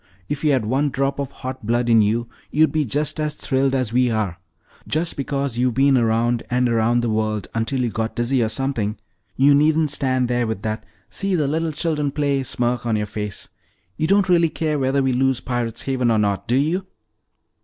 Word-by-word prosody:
If 145 +5 -4
you 150 - +3
had 130 -5 +1
one 135 +6 +1
drop 135 +1 -1
of 140 -2 -2
hot 130 -1 -7
blood 120 +2 0
in 115 -2 +5
you, 115 +3 +1 0.2
you'd 155 +1 +3
be 155 -1 +1
just 145 +5 -1
as 150 -1 -1
thrilled 135 0 0
as 125 -4 -1
we 125 0 +3
are. 105 -6 -2 0.5
Just 165 +2 -1
because 140 -3 -2
you've 125 -2 +1
been 135 +1 +4
around 115 0 +2
and 125 0 +2
around 115 +1 +2
the 120 - -1
world 110 -2 -1
until 115 +4 -1
you 120 - -1
got 110 +1 -3
dizzy 120 +2 +1
or 110 - +1
something, 115 -4 -2 0.4
you 140 +2 +5
needn't 155 +1 +3
stand 130 -3 0
there 120 -1 0
with 110 -3 -4
that 110 0 -3 0.2
'See 195 -1 -1
the 150 -5 +1
little 160 +2 -1
children 150 -2 -1
play' 140 -1 0
smirk 120 -2 -1
on 115 - +1
your 105 0 0
face. 105 0 -6 0.5
You 155 - -1
don't 195 +1 +3
really 170 -2 +4
care 155 -2 -1
whether 135 +1 +1
we 130 -1 +1
lose 130 0 +2
Pirate's 120 -3 -3
Haven 130 -3 0
or 115 - +3
not, 100 -2 0
do 120 - +2
you?" 165 +8 0
130 Hz, 210 wpm, -21 LUFS, 115-145 Hz, 0.5 s, in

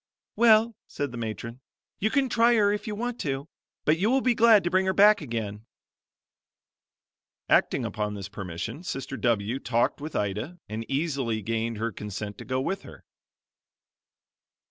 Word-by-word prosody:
"Well," 225 0 +5
said 145 -2 -4
the 120 - -7
matron, 115 +2 -5 0.4
"you 215 - +1
can 275 +2 +2
try 235 0 +4
her 205 -2 +4
if 210 +3 -4
you 210 - -3
want 240 +2 -3
to, 140 0 -3 0.4
but 155 +2 +3
you 205 +4 +2
will 265 +2 +3
be 250 -1 +3
glad 225 -3 +6
to 175 - -1
bring 190 +1 +2
her 190 - +2
back 210 0 +6
again." 110 -5 -5 1.8
Acting - - +3
upon 105 -1 -3
this 100 -2 -6
permission, 100 - -6
Sister 135 -6 -5
W 115 0 0
talked 120 +2 0
with 155 +1 -6
Ida 105 - -2
and 110 +2 -6
easily 135 -7 -1
gained 115 +1 -2
her 115 +2 -2
consent 105 0 -6
to - - -8
go 130 0 -1
with 190 +9 -2
her. - - -13
135 Hz, 165 wpm, -27 LUFS, -, 1.8 s, glad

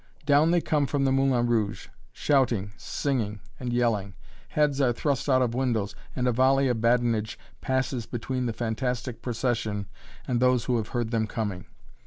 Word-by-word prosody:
Down 145 +2 +5
they 175 0 +3
come 150 -3 +1
from 135 +1 0
the 135 - +3
"Moulin 135 -3 +2
Rouge," 110 -3 0 0.2
shouting, 120 -8 +1
singing, 115 -8 -2 0.2
and 125 -2 -3
yelling. 110 -5 0 0.3
Heads 150 -2 +1
are 130 -3 +4
thrust 140 +3 -1
out 130 -1 +4
of 120 -2 -1
windows, 120 -5 0 0.2
and 125 0 0
a - - +4
volley 135 +3 +3
of 115 -3 0
badinage 115 -2 +1 0.2
passes 130 -3 -1
between 125 +1 -3
the - - 0
fantastic 120 +2 -3
procession 115 -4 -1 0.4
and 125 -3 +1
those 125 -1 +3
who 125 -2 +1
have 110 -1 -2
heard 120 -3 -2
them 110 -2 +1
coming. 100 -6 -4
120 Hz, 170 wpm, -27 LUFS, 115-130 Hz, 0.4 s, Down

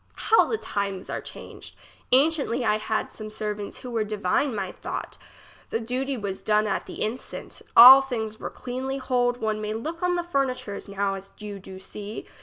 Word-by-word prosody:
How 450 - +4
the 445 - 0
times 200 - -3
are - - -3
changed! - - -10 0.4
Anciently 275 -3 +3
I 215 0 +2
had 215 0 -2
some 215 0 -8
servants 210 -1 -5
who 250 - -8
were 225 -2 +1
divine 210 +5 0
my 195 -3 -3
thought. - - -6 0.5
The 225 - -1
duty 255 +4 -2
was 200 -3 -4
done 215 0 +2
at 205 - -2
the - - -4
instant, 230 +4 -5 0.2
all 260 +3 +12
things 220 -5 -4
were - - -4
cleanly 260 +2 -4
hold 245 -2 +1
one 215 -1 -1
may 215 0 -2
look 320 +10 -5
on 360 0 +2
the 350 - -1
fur 275 -6 +1
nitures 210 -6 -6
now 200 0 -1
as 195 0 -8
you 205 -2 -7
do 190 0 -10
see. 205 +2 -7
220 Hz, 190 wpm, -25 LUFS, 205-260 Hz, 0.5 s, all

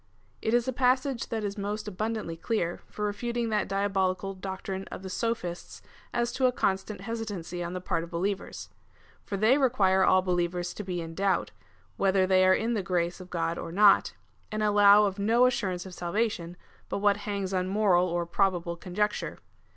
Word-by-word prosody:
It 220 - +1
is 240 +1 +1
a 260 - 0
passage 255 0 +1
that 225 -2 -3
is 205 0 -3
most 210 +1 -3
abundantly 210 -3 -3
clear, 175 -1 -2
for 210 - -4
refuting 235 +3 -2
that 210 -1 0
diabolical 195 -1 0
doctrine 190 0 -5
of - - -9
the 190 - -6
Sophists 205 -6 -3 0.3
as 240 0 0
to 255 0 +2
a - - +2
constant 195 -3 -1
hesitancy 200 -6 -4
on 170 +1 -5
the 185 - -4
part 165 - -1
of 170 - -9
believers. 190 +3 -3 0.5
For 200 - -4
they 225 +8 +4
require 195 -8 +3
all 185 0 +4
believers 175 -1 -1
to 210 - -6
be 180 -3 -3
in 165 0 -7
doubt, 195 +2 0 0.5
whether 190 -1 +3
they 185 0 +4
are 185 - +6
in 230 +2 -1
the 215 - 0
grace 175 0 -1
of 185 - -11
God 165 -1 -2
or - - -6
not, 200 +2 +5 0.4
and 215 0 -1
allow 205 0 +6
of 200 0 -2
no 230 +5 +4
assurance 195 -8 -1
of 190 - -9
salvation, 175 -1 -2 0.3
but - - -2
what 205 0 +3
hangs 200 -2 -3
on 185 0 0
moral 190 -3 +3
or 175 0 -1
probable 175 -1 0
conjecture. 210 +4 -2
195 Hz, 185 wpm, -28 LUFS, 180-215 Hz, 0.5 s, are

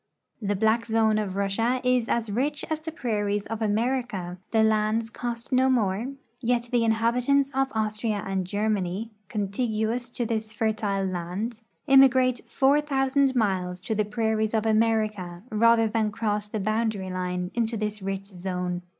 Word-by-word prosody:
The 205 -1 0
black 220 +3 +2
zone 220 -1 +3
of 195 -3 -3
Russia 225 +6 +1
is 250 -2 +2
as 230 -3 0
rich 280 +7 -1
as 315 0 -1
the 320 +1 -5
prairies 205 -7 -1
of 225 0 -5
America; 215 -5 -1
the 220 -1 +3
lands 220 +1 +1
cost 235 0 -5
no 260 +1 +4
more; 220 -2 +1 0.3
yet 240 -1 0
the 240 -2 +3
inhabitants 245 +5 +2
of 270 0 +1
Austria 215 -1 -1
and 190 -2 -2
Ger 205 +3 -1
many, 205 +1 -1 0.2
contiguous 220 +3 -1
to 240 0 -3
this 220 -1 -2
fertile 210 -3 0
land, 190 +6 -4 0.2
immigrate 260 -3 +5
four 280 +2 +3
thousand 270 -1 +1
miles 185 -5 0
to 220 - -2
the 215 0 +1
prairies 220 +1 0
of 220 0 +1
America 215 -5 +1
rather 225 +1 +4
than 215 -1 0
cross 210 -1 -2
the 215 - -3
boundary 215 -2 -1
line 180 0 -3
into 230 -1 0
this 210 0 -3
rich 195 0 -3
zone. 180 -2 -4
220 Hz, 160 wpm, -26 LUFS, 205-240 Hz, 0.3 s, immigrate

